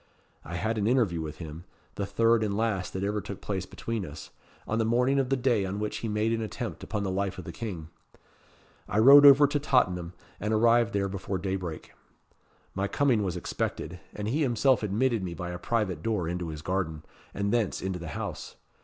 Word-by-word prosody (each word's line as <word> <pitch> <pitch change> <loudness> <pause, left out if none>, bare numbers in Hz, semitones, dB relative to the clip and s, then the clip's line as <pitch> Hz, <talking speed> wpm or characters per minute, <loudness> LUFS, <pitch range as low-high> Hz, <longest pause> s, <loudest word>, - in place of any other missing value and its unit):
I 85 - -7
had 110 +6 -1
an 105 - +1
interview 110 -10 +2
with 75 -1 -6
him 80 0 -8 0.3
the 100 - -3
third 115 +2 +3
and 100 -1 -1
last 110 -5 -1
that 95 - -3
ever 105 +1 -1
took 100 -1 -7
place 95 -3 -3
between 115 -3 -4
us 75 -3 -9 0.4
on 110 - 0
the - - +3
morning 125 +5 +2
of 130 -2 0
the 135 - +2
day 120 -5 +2
on 95 +1 -3
which 105 0 -3
he 115 - -4
made 110 +1 0
an 115 - -1
attempt 110 - -5
upon 105 -2 -3
the 95 - -1
life 95 0 -2
of 95 - -6
the - - -6
King. 85 -5 -6 1.0
I 100 - -1
rode 140 +6 +9
over 140 +1 +8
to 145 +1 0
Tottenham, 90 - +1 0.3
and 105 +2 0
arrived 115 +1 +4
there 100 -1 +1
before 95 0 -3
daybreak. 95 -3 -4 0.8
My 100 +1 -1
coming 130 -2 +2
was 90 -3 -2
expected, 85 0 -4 0.2
and 105 0 -4
he 140 +8 0
himself 130 -1 +3
admitted 110 +3 +1
me 90 -2 -4
by 90 -1 -5
a 90 - -6
private 100 -7 -1
door 105 -4 -1
into 90 0 -3
his 75 -1 -7
garden, 85 -4 -2 0.3
and 100 +2 -1
thence 115 -5 +1
into 95 -1 -3
the 85 - -7
house. - - -6
100 Hz, 205 wpm, -28 LUFS, 90-115 Hz, 1.0 s, rode